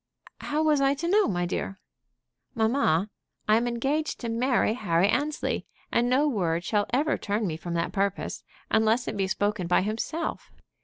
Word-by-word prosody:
"How 300 +2 -1
was 300 -2 +3
I 275 +1 +3
to 325 +4 -3
know, 415 +4 +4
my 175 -2 0
dear?" 190 +2 -3 0.8
"Mamma, 220 - +2 0.4
I 215 - +5
am 240 +1 0
engaged 270 +6 -1
to 235 - -3
marry 240 0 +2
Harry 185 -5 +2
Annesley, 295 +7 -1 0.2
and 240 +1 +2
no 275 +4 +3
word 175 - 0
shall 205 +2 0
ever 290 +5 +1
turn 210 +1 -1
me 165 -5 -2
from 170 +2 -5
that 170 0 -1
purpose, 200 -1 -2 0.3
unless 220 +3 +2
it - - -3
be 195 -1 0
spoken 205 -1 -1
by 180 - +3
himself. 225 - -3
220 Hz, 170 wpm, -27 LUFS, 195-275 Hz, 0.8 s, I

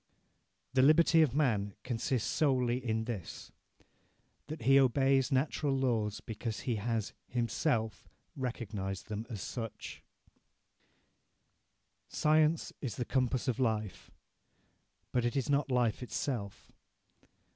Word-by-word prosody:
"The 130 - +4
liberty 160 +3 +6
of 140 -5 +2
man 105 -9 +1
consists 125 -1 -1
solely 125 -4 +1
in 110 -2 0
this: 110 -7 -6 1.0
that 155 -4 -6
he 135 +3 +6
obeys 135 0 +3
natural 140 +1 +1
laws 115 -6 0
because 110 0 -5
he 120 -4 -1
has 110 0 -2
himself 115 -1 -1 0.3
recognized 105 -7 -4
them 110 +2 -4
as 105 -5 -5
such 115 -3 -6 2.1
"Science 155 +1 +2
is 130 -6 -3
the 125 - -3
compass 130 0 0
of 130 0 0
life; 110 -5 -1 1.0
but 125 - +1
it 120 +3 -1
is 135 +1 0
not 140 0 +1
life 125 -3 +1
itself.... 120 -5 -4
125 Hz, 115 wpm, -32 LUFS, 110-135 Hz, 2.1 s, liberty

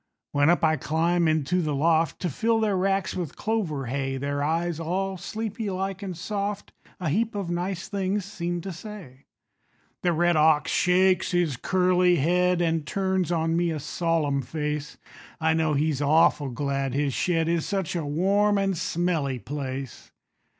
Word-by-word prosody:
When 145 +2 +3
up 175 - +3
I 160 0 +3
climb 170 +3 +1
into 155 +3 +1
the 150 -3 -1
loft 160 +2 +2
To 180 - 0
fill 225 - +1
their 215 -3 +1
racks 195 0 0
with 175 -6 -4
clover 185 -12 -2
hay, 135 +2 -2
Their 140 +1 -2
eyes, 165 +2 -1
all 190 +4 -2
sleepy 215 +3 -4
like 190 +1 -3
and 185 -4 -5
soft, 205 +2 -4 0.3
A 180 -4 -1
heap 215 +7 0
of 195 -4 -3
nice 175 +1 -3
things 200 0 -1
seem 175 -4 -3
to 195 - -5
say. 170 - -10 0.8
The 175 - +2
red 175 +1 +2
ox 155 0 +4
shakes 185 0 +3
his 175 -6 +1
curly 180 +4 +3
head, 180 +3 +2
An' 165 -1 +1
turns 190 +2 -1
on 165 -1 +1
me 170 0 +1
a 160 -2 -2
solemn 155 -2 0
face; 150 +2 -4 0.4
I 160 0 +2
know 160 -2 +1
he's 145 -1 0
awful 145 -1 +3
glad 135 +1 -2
his 140 -1 0
shed 165 +1 +1
Is 170 -1 0
such 190 -4 -2
a 170 - -1
warm 200 +8 +2
and 195 -1 +1
smelly 165 -6 -1
place. 135 -1 -6
170 Hz, 165 wpm, -26 LUFS, 150-190 Hz, 0.8 s, ox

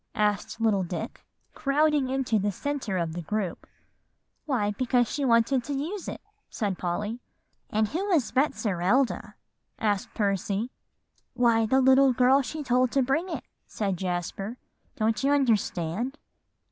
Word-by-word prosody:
asked 210 +1 0
little 220 -4 +2
Dick, 180 +5 -5 0.3
crowding 295 -1 +2
into 260 -5 +1
the 205 +1 0
centre 255 -2 -3
of 165 -2 -1
the 175 - -4
group. 200 +1 -3 0.8
"Why, 220 -8 +1
because 245 +2 +1
she 290 - -3
wanted 240 +1 +3
to 285 - -3
use 345 +7 -4
it," - - -6 0.3
said 200 -5 -2
Polly. 205 +6 -2 0.5
"And 215 0 +1
who 365 +7 -2
was 330 - +2
Betserilda?" 250 - +1 0.4
asked 205 -3 -1
Percy. 200 +3 -1 0.6
"Why, 230 -2 +3
the 265 +2 +5
girl 260 +2 +5
she 300 +3 -5
told 250 -1 +2
to 275 - +3
bring 320 +8 0
it," - - -4 0.2
said 200 -3 -2
Jasper; 185 +5 -3 0.4
"don't 220 +2 0
you 280 +1 +3
understand?" 230 - 0
235 Hz, 135 wpm, -27 LUFS, 205-270 Hz, 0.8 s, the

